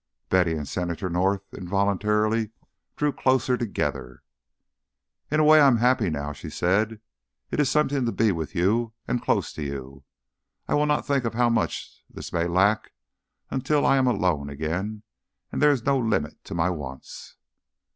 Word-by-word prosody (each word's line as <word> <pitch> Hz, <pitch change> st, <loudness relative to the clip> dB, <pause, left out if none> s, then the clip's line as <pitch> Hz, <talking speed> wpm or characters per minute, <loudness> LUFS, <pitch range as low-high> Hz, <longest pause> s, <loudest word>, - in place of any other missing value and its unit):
Betty 90 Hz, -3 st, +3 dB
and 75 Hz, -3 st, -4 dB
Senator 90 Hz, 0 st, -3 dB
North 95 Hz, +3 st, +1 dB
involuntarily 105 Hz, +3 st, 0 dB, 0.5 s
drew 150 Hz, 0 st, +1 dB
closer 130 Hz, -1 st, +2 dB
together. 100 Hz, -, -3 dB, 1.1 s
"In 155 Hz, -, +1 dB
a -, -, +5 dB
way 155 Hz, 0 st, +7 dB
I 140 Hz, -, +7 dB
am 125 Hz, -3 st, +4 dB
happy 120 Hz, -4 st, +2 dB
now," 75 Hz, -1 st, -3 dB
she -, -, -9 dB
said. 105 Hz, +5 st, 0 dB, 0.5 s
"It -, -, -2 dB
is 145 Hz, -3 st, +3 dB
something 140 Hz, -3 st, +1 dB
to -, -, +1 dB
be 110 Hz, -2 st, +2 dB
with 80 Hz, -4 st, -4 dB
you 110 Hz, +6 st, +1 dB
and 125 Hz, -, -1 dB
close -, -, 0 dB
to -, -, -7 dB
you. 70 Hz, -1 st, -6 dB, 0.6 s
I -, -, -1 dB
will 150 Hz, 0 st, +2 dB
not 150 Hz, 0 st, +1 dB
think 140 Hz, -2 st, +1 dB
of 115 Hz, -1 st, -3 dB
how 120 Hz, 0 st, +3 dB
much 115 Hz, -, -2 dB
this -, -, -9 dB
may 85 Hz, 0 st, +1 dB
lack 100 Hz, +5 st, +2 dB, 0.6 s
until 140 Hz, +3 st, +1 dB
I 135 Hz, -, +4 dB
am 130 Hz, -1 st, +3 dB
alone 90 Hz, -, +1 dB
again 90 Hz, +9 st, -4 dB, 0.5 s
and -, -, -3 dB
there 150 Hz, -, +6 dB
is 135 Hz, -5 st, +1 dB
no 140 Hz, -1 st, +3 dB
limit 115 Hz, -3 st, -1 dB
to -, -, -6 dB
my 85 Hz, +2 st, +1 dB
wants." 65 Hz, -6 st, -8 dB
105 Hz, 170 wpm, -25 LUFS, 85-125 Hz, 1.1 s, way